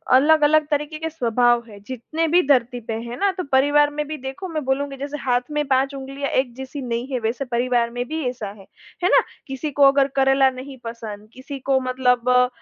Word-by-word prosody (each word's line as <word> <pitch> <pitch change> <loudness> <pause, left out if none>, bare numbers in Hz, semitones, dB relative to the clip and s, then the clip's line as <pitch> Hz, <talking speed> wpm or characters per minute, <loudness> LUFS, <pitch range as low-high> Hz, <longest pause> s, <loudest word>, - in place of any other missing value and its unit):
अलग-अलग 305 +2 +5
तरीके 295 +1 -1
के 320 0 -3
स्वभाव 240 -5 +2
है, 205 -2 -12
जितने 285 +6 -2
भी 345 +3 +4
धरती 250 -3 +2
पे - - 0
हैं 235 +1 -6
ना। 400 0 +2
तो 365 - -2
परिवार 290 +2 +4
में 300 0 -3
भी 310 +1 -5
देखो 270 +8 -6
मैं 315 -3 -3
बोलूँगी, 275 +1 -1
जैसे 285 +2 -5
हाथ 245 -1 +1
में 295 0 0
5 270 +1 +1
उँगलियाँ 275 +1 -5
एक 260 -2 0
जैसी 265 +2 -7
नहीं 240 0 -3
है, 255 - -1
वैसे 235 +4 -2
परिवार 240 -1 +1
में 245 +1 -3
भी 320 +3 -3
ऐसा 245 -4 -6
है, 195 - -15 0.4
है 360 - +4
ना। - - +7 0.3
किसी 270 +3 -4
को 285 0 +2
अगर 275 0 +3
करेला 270 0 +4
नहीं 260 +1 -9
पसंद, 220 -3 -7
किसी 265 +2 -8
को 265 0 +1
मतलब 250 -1 +1
अ, 250 0 +5
265 Hz, 215 wpm, -22 LUFS, 245-290 Hz, 0.4 s, ना